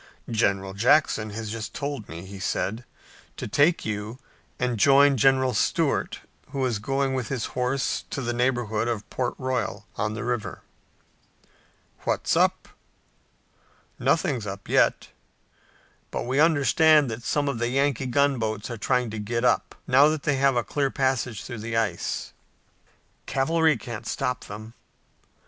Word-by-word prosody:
"General 100 -4 0
Jackson 110 0 +3
has 105 0 -5
just 110 -2 -6
told 140 -6 -4
me," 85 +3 -8
he 100 0 -9
said, 110 +5 -2 0.5
"to - - -4
take 155 +4 +3
you 105 +2 -4 0.4
and 125 -3 -1
join 140 +4 +6
General 130 +1 +3
Stuart, 105 - 0 0.3
who 135 -2 -1
is 120 -5 -1
going 135 +4 0
with 130 -3 -2
his 130 -5 -2
horse 125 +2 -1
to - - -4
the 120 -2 -2
neighborhood 120 -3 0
of 115 -3 -3
Port 125 -2 -2
Royal 130 -6 -2
on 105 +1 -1
the 115 - -4
river." 120 -3 -3 1.4
"What's - - 0
up?" - - +2 1.3
"Nothing's 115 -6 +1
up 95 0 -7
yet. - - +2 1.0
But - - -3
we 130 +3 -1
understand 155 -2 +4
that 110 +2 -5
some 145 +4 0
of 130 -5 -2
the 120 - 0
Yankee 135 0 +1
gunboats 120 -5 0
are 120 - -5
trying 125 -1 0
to 110 - -5
get 115 +3 -2
up, - - +1
now 135 +3 +6
that 155 -1 -1
they 145 -2 +1
have 135 -1 +3
a 120 - +1
clear 140 +2 -1
passage 130 -5 -1
through 120 -3 -7
the 115 +1 -3
ice." 115 -2 -2 0.9
"Cavalry 160 +2 +2
can't 115 -1 -7
stop 125 -1 -2
them." 110 +2 -9
125 Hz, 150 wpm, -25 LUFS, 110-135 Hz, 1.4 s, join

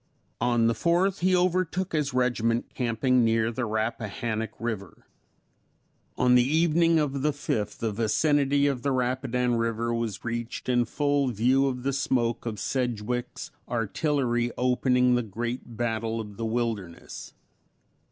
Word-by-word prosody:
On 120 -1 +2
the 115 - +3
4th, 175 - +1
he 185 +1 +3
overtook 185 0 0
his 150 -3 0
regiment 120 -2 0
camping 125 +1 +1
near 115 0 +2
the 120 +1 -2
Rappahannock 110 0 -2
river; 110 -5 -5 1.1
on 125 0 +4
the 125 - +7
evening 165 +3 +3
of 140 -3 0
the 150 - +2
5th 105 -7 -3
the 115 -1 -2
vicinity 140 +6 +2
of 140 -3 0
the 140 - 0
Rapidan 125 -1 0
river 115 0 -1
was 115 -4 -3
reached 120 0 -4
in 120 -1 +2
full 145 +2 +1
view 125 +4 +2
of 125 -2 -3
the 140 +1 0
smoke 120 -3 0
of 110 -3 -4
Sedgwick's 125 -1 -3 0.2
artillery 120 +1 0
opening 125 0 +3
the 125 - +2
great 120 +2 -5
battle 115 -1 -1
of 105 -2 -7
the 115 - -4
Wilderness. 110 -7 -4
120 Hz, 140 wpm, -27 LUFS, 115-135 Hz, 1.1 s, the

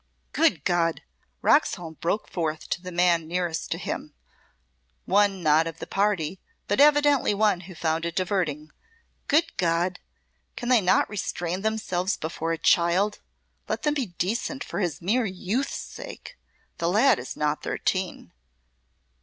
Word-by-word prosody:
"Good 250 - +2
God!" 170 -2 +1 0.4
Roxholm 175 - +2
broke 195 +6 -1
forth 160 -3 -3
to 175 - -1
the 180 0 -7
man 170 -2 +2
nearest 175 -1 -2
to - - -1
him, - - -5 0.9
one 195 -1 +2
not 155 +1 +4
of 165 -1 -6
the - - -6
party, 195 -4 0 0.3
but - - 0
evidently 290 -6 +5
one 210 -3 +3
who 185 0 -11
found 160 0 -1
it 170 0 -3
diverting; 170 -6 -1 0.6
"good 320 +3 +2
God! 175 -1 +1 0.6
Can 240 - -4
they 250 -3 +5
not 180 - +3
restrain 180 -3 -3
themselves 205 -3 -1
before 160 +1 -3
a 165 - 0
child? 180 +6 +2 0.5
Let - - -2
them 300 -1 +2
be 275 -6 -1
decent 215 - -2
for 175 - -5
his 175 -5 -2
mere 225 +5 +2
youth's 195 +8 -2
sake! - - -9 0.4
The 170 - +1
lad 230 +9 +4
is 125 - -7
not 150 0 0
thirteen." 185 - -2
180 Hz, 145 wpm, -26 LUFS, 165-210 Hz, 0.9 s, evidently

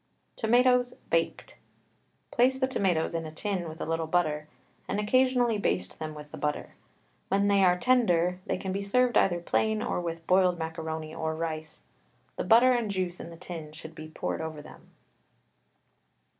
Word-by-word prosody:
TOMATOES, 245 +2 +3 0.2
BAKED. 165 0 -1 0.7
Place 255 +2 +3
the 260 - +2
tomatoes 180 -10 0
in 165 -1 -3
a - - -8
tin 180 0 -3
with 160 +1 -10
a - - -3
little 165 0 -1
butter, 155 -3 0 0.4
and 200 - -1
occasionally 245 0 +2
baste 90 - -1
them 155 -1 -5
with 150 -1 -10
the - - -8
butter. 150 0 -2 0.5
When 200 +1 +2
they 200 -1 +4
are 180 -1 +5
tender, 180 -7 +2
they - - 0
can 190 - -4
be 195 +1 -2
served 245 +5 +2
either 175 -2 +3
plain 220 +5 0
or 240 - -1
with 165 -1 -5
boiled 185 -1 +3
macaroni 160 -1 -5
or 160 -1 -2
rice. 155 -1 -5 0.5
The - - -2
butter 240 +3 +6
and 240 -4 +1
juice 185 -2 -2
in - - -7
the 165 - -11
tin 165 -3 -8
should 160 +1 -10
be 155 0 -9
poured 155 - -4
over 160 -1 -5
them. 150 +1 -14
175 Hz, 170 wpm, -28 LUFS, 160-215 Hz, 0.7 s, butter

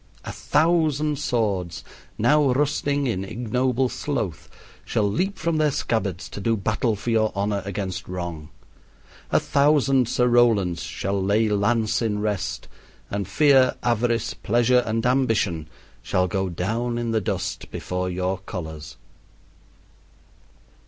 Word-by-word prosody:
A - - -4
thousand 155 -2 +1
swords, 100 - -1 0.3
now 145 +4 +4
rusting 145 0 0
in 110 -7 -1
ignoble 125 +4 0
sloth, 115 - -4 0.3
shall 105 - 0
leap 185 - -1
from 170 0 -1
their 155 -1 +3
scabbards 100 - -2
to 100 - -7
do 115 +3 +1
battle 110 +2 0
for 110 +4 -3
your 110 -1 +2
honor 100 0 -1
against 100 -2 -4
wrong. 85 -4 -5 0.8
A - - +3
thousand 140 -3 +3
Sir 125 - +2
Rolands 110 -8 +3
shall 100 +1 -2
lay 105 +3 +2
lance 110 +3 +1
in 110 -3 0
rest, 105 -2 -2 0.4
and 100 -2 -2
Fear, 135 -4 +4
Avarice, 120 -2 +1
Pleasure, 120 +3 +2
and 115 +1 -1
Ambition 115 - +1 0.3
shall 90 0 0
go 95 0 -1
down 115 +8 -2
in 120 -1 -2
the 110 -1 +1
dust - - -3
before 90 0 -3
your 90 +1 -2
colors. 80 -5 -7
110 Hz, 130 wpm, -24 LUFS, 95-125 Hz, 0.8 s, now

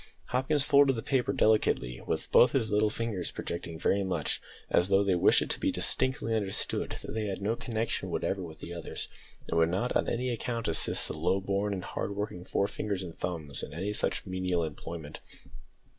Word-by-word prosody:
Hopkins 135 +4 +2
folded 140 -2 +5
the 115 - -4
paper 130 -3 +1
delicately 105 - +2
with - - -2
both 125 - +7
his 115 -6 +1
little 105 +1 +3
fingers 105 -5 -2
projecting 85 -1 -5
very 100 +4 +2
much, 90 -6 -1 0.3
as 85 - +3
though 100 +1 +4
they 100 -2 +2
wished 90 - +5
it - - -7
to - - +2
be - - +1
distinctly 130 -3 0
understood 100 -3 -1
that - - -6
they 110 -1 -1
had 95 -2 -3
no 105 +4 0
connection 115 -1 -2
whatever 95 - -1
with 80 -3 -9
the 85 - -6
others, 85 - -5 0.4
and 85 - +1
would 80 0 +4
not 100 +8 -1
on - - +2
any 125 +1 -1
account 115 0 -2
assist 80 -1 +2
the - - -4
low 95 - +1
born 100 +1 -1
and 95 -2 -3
hard 100 - -3
working 100 -3 -4
forefingers 100 0 -1
and 85 -3 -9
thumbs 80 -6 -2
in 90 +8 -3
such - - -1
menial 90 -2 0
employment. 80 0 -6
100 Hz, 190 wpm, -30 LUFS, 85-115 Hz, 0.4 s, both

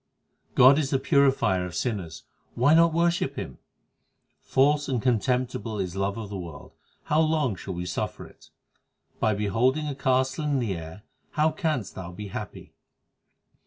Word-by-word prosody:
19 - - -34
God 135 +4 +7
is 140 -3 -1
the 135 - +2
Purifier 135 -9 +2
of 90 -1 -6
sinners; 90 -5 -3 0.3
why 135 +6 +4
not 165 +1 +6
worship 170 +1 +1
Him? - - -7 0.8
False 145 +2 +2
and 130 -3 0
contemptible 125 -2 0
is 95 -2 -3
love 100 +1 -1
of 110 -3 -6
the 100 - -4
world; 85 -5 -9 0.3
how 150 - +1
long 155 -8 +1
shall 95 +1 -7
we 90 +1 -4
suffer 90 - -4
it? - - -18 0.7
By 110 -1 +2
beholding 125 +9 +1
a 145 - -2
castle 130 +1 0
in 145 -2 +1
the 115 -7 -1
air 80 +4 -9 0.3
how 155 +1 +2
canst 155 - -2
thou 90 -2 -7
be 100 +3 -8
happy - - -8
125 Hz, 165 wpm, -26 LUFS, 100-145 Hz, 0.8 s, God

